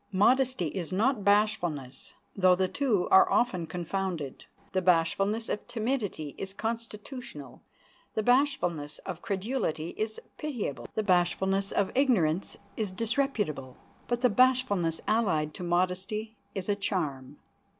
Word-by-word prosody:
Modesty 240 - +3
is 175 +1 -5
not 215 +4 +1
bashfulness, 195 -10 +1 0.2
though 185 -2 +5
the 185 +1 +1
two 225 -6 +1
are 380 -1 +7
often 185 -9 +1
confounded. 175 -3 -4 0.2
The 185 - +1
bashfulness 185 +5 +2
of 210 - -3
timidity 215 - -2
is 195 0 -5
constitutional, 225 - -6 0.5
the 220 - 0
bashfulness 225 - +1
of 175 -3 -5
credulity 195 -6 -2
is 220 0 -2 0.2
pitiable, 245 - -4
the 220 - 0
bashfulness 190 +1 +2
of 200 - +1
ignorance 200 - +2 0.2
is 215 -3 -2
disreputable, 210 - -1 0.3
but 240 0 -1
the 250 - +5
bashfulness 205 -9 +3
allied 180 -9 +1
to - - -7
modesty 185 +5 -1 0.2
is 190 -2 -3
a 205 - +2
charm. 150 -9 -3
195 Hz, 125 wpm, -29 LUFS, 175-230 Hz, 0.5 s, are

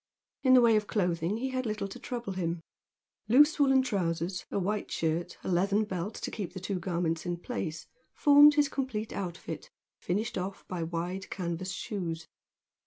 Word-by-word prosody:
In 260 -1 +6
the 250 - +8
way 230 -2 +5
of 210 -1 -1
clothing 175 -1 0
he 265 +3 -2
had 255 -2 -2
little 215 -2 -2
to 195 - -9
trouble 235 -5 -4
him. 170 -2 -2 0.7
Loose 295 +7 +6
woollen 270 -2 +5
trousers, 180 -5 -2
a - - -2
white 200 +2 -1
shirt, 165 +1 -1
and - - -2
a - - +2
leathern 200 +4 +2
belt 190 0 -4
to - - -4
keep 195 -6 -5
the 185 - -5
two 185 0 -3
garments 170 -2 -1
in 175 -1 -2
place, 170 -6 -4 0.3
formed 290 0 +7
his 295 -1 +4
complete 255 -6 -3
outfit, 185 - -5 0.3
finished 210 +4 -1
off 190 +2 -6
by 180 -2 -4
wide 175 +3 -3
canvas 180 0 -3
shoes. 170 -4 -4
195 Hz, 175 wpm, -30 LUFS, 175-230 Hz, 0.7 s, the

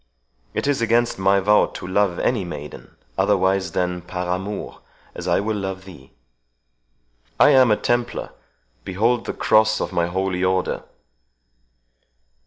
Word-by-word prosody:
It - - -1
is 140 -3 +1
against 115 -1 +1
my 95 +1 +3
vow 105 +2 +4
to - - -7
love 95 -1 +1
any 115 -6 0
maiden, 75 -4 -9 0.2
otherwise 95 0 +1
than 90 -1 -1
'par 90 0 -3
amours', 100 +2 -6 0.3
as - - -7
I - - +3
will 110 +2 -1
love 95 -1 -5
thee. 80 -9 -14 1.3
I - - +7
am 130 -3 +6
a 105 - +3
Templar. 120 0 -1 0.5
Behold 115 +6 0
the - - -2
cross 110 0 +3
of - - -3
my 85 -1 +1
Holy 95 +1 -2
Order." 95 0 0
95 Hz, 140 wpm, -22 LUFS, 90-110 Hz, 1.3 s, I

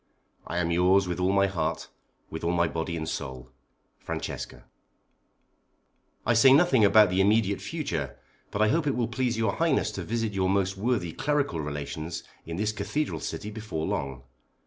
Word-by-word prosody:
I 85 - -3
am 85 -1 0
yours 90 +3 +4
with 90 0 -3
all 90 +1 +2
my 100 0 +4
heart, 95 -3 -2 0.4
with 80 - -6
all 85 +1 +1
my 85 -1 +2
body 80 +1 -3
and 80 -1 -4
soul. 65 -4 -5 0.5
FRANCESCA. - - -5 1.6
I 120 - +3
say 130 +4 +7
nothing 140 -5 +5
now 105 - +7
about 105 -1 +6
the 95 +1 +2
immediate 100 0 +2
future, 85 - -3 0.3
but 105 - +1
I 110 - +4
hope 160 +2 +1
it 140 - +1
will 120 -2 0
please 120 -1 -1
your 110 -3 0
highness - - +2
to - - -5
visit 115 -2 -2
your 95 -1 +1
most 95 0 +1
worthy 100 -5 -1
clerical 140 - 0
relations 75 +3 -5 0.2
in 85 0 -4
this 105 +2 0
cathedral 110 +9 -2
city 105 - -5
before 105 -7 -4
long. 65 -3 -3
100 Hz, 175 wpm, -27 LUFS, 85-115 Hz, 1.6 s, say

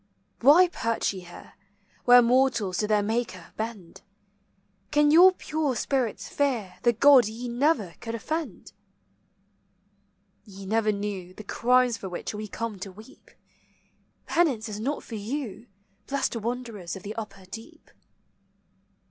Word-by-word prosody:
Why 305 +9 +7
perch 230 -11 -1
ye 190 - -7
here, 175 -1 -13 0.5
Where 245 0 +8
mortals 235 -7 +2
to 210 - 0
their 210 -1 +2
Maker 215 -5 -3
bend? 215 -6 -6 0.9
Can 295 +3 +3
your 355 +4 +8
pure 305 -6 -2
spirits 250 -1 -1
fear 245 -10 -2
The 240 - +4
God 255 0 +6
ye 230 +3 -6
never 240 - +1
could 230 -1 -4
offend? 315 +8 -5 1.7
Ye 195 -2 -11
never 215 +2 +1
knew 200 -3 -5
The 215 - -9
crimes 250 +2 +2
for 190 - -7
which 180 - -5
we 210 0 -5
come 220 -1 -5
to 190 +1 -7
weep. 215 +7 -16 1.0
Penance 270 -11 +1
is 210 -1 -6
not 275 +7 -3
for - - -11
you, 225 +1 -5 0.4
Blessed 275 -3 -1
wanderers 230 -5 -5
of 190 - -10
the 210 +1 -5
upper 210 -4 -8
deep. 225 +5 -12
230 Hz, 135 wpm, -26 LUFS, 205-260 Hz, 1.7 s, Where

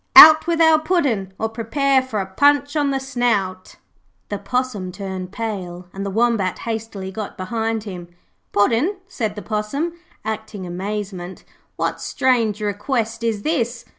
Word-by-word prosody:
'Out 315 +1 +11
with 335 -1 +1
our 320 -1 +6
Puddin', 285 - 0
or 220 - 0
prepare 260 +5 +1
for 255 -5 -3
a 195 - -1
punch 285 +8 +3
on 290 -2 +2
the 270 -1 0
snout.' 225 -8 -1 0.5
The 205 - -3
Possum 250 -8 -2
turned 185 -1 -6
pale 185 -5 -5
and 195 - -5
the 200 - -2
Wombat 220 -3 +1
hastily 220 -4 -5
got 210 +1 -6
behind 225 +3 -2
him. 180 -5 -7 0.4
'Puddin',' 235 - +2
said 220 - -3
the 210 - -7
Possum, 220 +11 -2 0.3
acting 220 -3 -4
amazement. 190 0 -5 0.3
'What - - -2
strange 225 -5 +1
request 225 +2 -1
is 220 -3 -1
this?' 240 -7 -1
220 Hz, 145 wpm, -21 LUFS, 195-260 Hz, 0.5 s, Out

